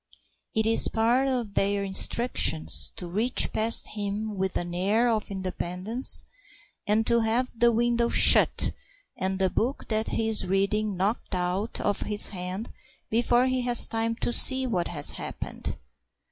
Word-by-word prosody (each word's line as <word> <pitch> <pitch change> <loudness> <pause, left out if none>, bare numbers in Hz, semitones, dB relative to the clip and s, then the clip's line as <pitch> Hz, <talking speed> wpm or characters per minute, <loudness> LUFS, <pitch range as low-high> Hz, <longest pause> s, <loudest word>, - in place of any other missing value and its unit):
It 220 0 0
is 225 +1 +6
part 240 +4 0
of 245 -6 -3
their 200 0 -1
instructions 80 - +2
to - - -5
reach 215 +8 +1
past 225 +1 +2
him 210 +1 -5
with 190 -1 -3
an 175 0 -6
air 205 +7 0
of 220 -3 -2
independence 190 +4 +1 0.6
and 215 +2 +1
to 235 +1 +2
have 230 +3 -1
the 235 +1 +2
window 235 +1 0
shut - - +4 0.4
and 190 0 -3
the 190 -1 0
book 255 +5 -3
that 220 0 -1
he 225 - -2
is 215 -4 0
reading 200 +1 -1
knocked 195 +1 -3
out 180 +5 -3
of 205 -1 -2
his 210 -1 +4
hand 185 +3 -6 0.4
before 240 +2 +1
he 255 0 -1
has 245 -1 +5
time 225 0 -3
to 240 - -3
see 260 +1 +3
what 185 -9 -2
has 150 -4 -1
happened. - - -7
215 Hz, 155 wpm, -25 LUFS, 190-235 Hz, 0.6 s, is